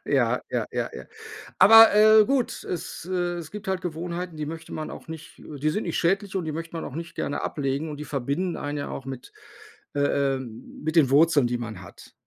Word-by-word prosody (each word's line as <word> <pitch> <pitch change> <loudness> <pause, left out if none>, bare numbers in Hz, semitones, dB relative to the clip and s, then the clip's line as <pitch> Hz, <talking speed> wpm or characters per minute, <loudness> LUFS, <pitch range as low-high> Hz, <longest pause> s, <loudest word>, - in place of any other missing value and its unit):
Ja, - - +1
ja, - - -1
ja, - - -2
ja. - - -8 0.5
Aber, 225 0 +9
äh, 215 0 +7
gut, 265 -2 0
es 175 0 -6
äh, 175 -1 -1
es 160 -3 -8
gibt 210 -1 -8
halt 190 -1 0
Gewohnheiten, 175 0 -5
die 150 - -3
möchte 165 +1 -8
man 155 - -5
auch - - -10
nicht 160 -1 -10
die 150 0 -3
sind 210 - -2
nicht 170 - -2
schädlich 195 +3 0
und 180 - -1
die 155 - -3
möchte 165 +1 -6
man 165 - -4
auch 135 - -8
nicht 170 +1 -7
gerne 145 - -3
ablegen 140 +1 -2
und 150 - -6
die 150 - -6
verbinden 145 +7 -2
einen 145 0 -4
ja 145 - -4
auch 135 - -7
mit, 130 -2 -8 0.6
äh, 140 -1 +1
äh - - -4
mit 130 +7 -7
den 145 -5 +6
Wurzeln, 150 -2 +5
die 120 0 -1
man 110 -5 -6
hat. 85 - -14
160 Hz, 220 wpm, -25 LUFS, 140-180 Hz, 0.6 s, Aber